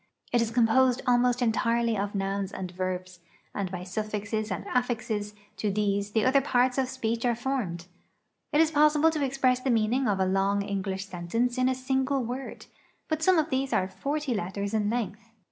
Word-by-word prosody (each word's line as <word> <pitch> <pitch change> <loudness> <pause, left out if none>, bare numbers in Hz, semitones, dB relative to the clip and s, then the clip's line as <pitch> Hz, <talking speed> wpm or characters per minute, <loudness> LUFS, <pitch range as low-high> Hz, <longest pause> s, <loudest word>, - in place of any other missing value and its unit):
It 240 - +4
is 230 - 0
composed 245 +2 +3
almost 245 0 +3
entirely 230 0 +1
of 205 0 -2
nouns 195 0 -2
and 185 -3 -5
verbs, 185 0 -4 0.3
and 195 -2 -2
by 180 -1 -5
suffixes 210 +2 -3
and 185 - -4
affixes 225 -4 -1 0.2
to 210 - -1
these 200 0 -1
the 220 0 +2
other 270 +2 +4
parts 255 -1 +2
of 260 -1 0
speech 235 -3 -2
are 240 -2 +2
formed. 225 -9 -3 0.7
It 300 - +4
is 320 -1 +3
possible 300 +1 +4
to 305 -2 -1
express 260 -2 +2
the 260 - -2
meaning 235 +3 +2
of 200 -2 +1
a 190 - +3
long 195 +2 +1
English 195 -1 -3
sentence 195 +7 -1
in 255 0 +3
a 260 - 0
single 265 +1 0
word, 250 +3 -6 0.4
but 315 0 -1
some 370 +2 +4
of 315 0 +1
these 265 +1 0
are 185 - +2
forty 285 +5 -2
letters 200 +1 -3
in 210 -1 +1
length. 225 -1 -3
230 Hz, 185 wpm, -27 LUFS, 200-260 Hz, 0.7 s, It